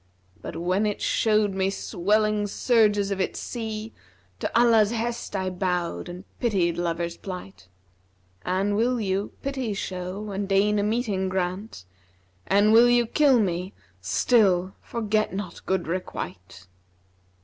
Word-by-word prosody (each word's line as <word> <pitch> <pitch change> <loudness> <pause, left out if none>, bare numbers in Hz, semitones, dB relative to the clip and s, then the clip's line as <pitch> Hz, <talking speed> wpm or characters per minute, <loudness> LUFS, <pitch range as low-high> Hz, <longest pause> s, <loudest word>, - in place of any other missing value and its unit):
But - - -7
when 185 +5 0
it 205 - -2
showed 215 -2 +2
me 190 0 +1
swelling 210 +2 0
surges 205 -3 +2
of 195 -1 -1
its - - -2
sea, 220 -2 -5 0.2
* 90 0 -36
To - - 0
Allah's 225 -3 +5
hest 235 -1 -3
I 190 -1 -1
bowed 180 -1 -2
and 180 +2 -8 0.2
pitied 180 -7 +1
lover's 170 0 -2
plight. 100 - -8 0.8
An 190 +3 0
will 240 +4 +1
you, 195 -1 -2
pity 265 -6 -2
show 190 +2 -5
and 200 0 -3
deign 205 +2 +3
a - - +1
meeting 210 -4 0
grant, 185 - -3 0.3
* 90 +1 -37
An 205 +2 +4
will 235 +2 +7
you 240 0 +4
kill 270 +1 +4
me 185 -1 -1 0.3
still 185 - +2
forget 215 -3 -1
not 190 -4 -6
good 190 -2 0
requite.' 95 - -6
195 Hz, 140 wpm, -25 LUFS, 180-215 Hz, 0.8 s, will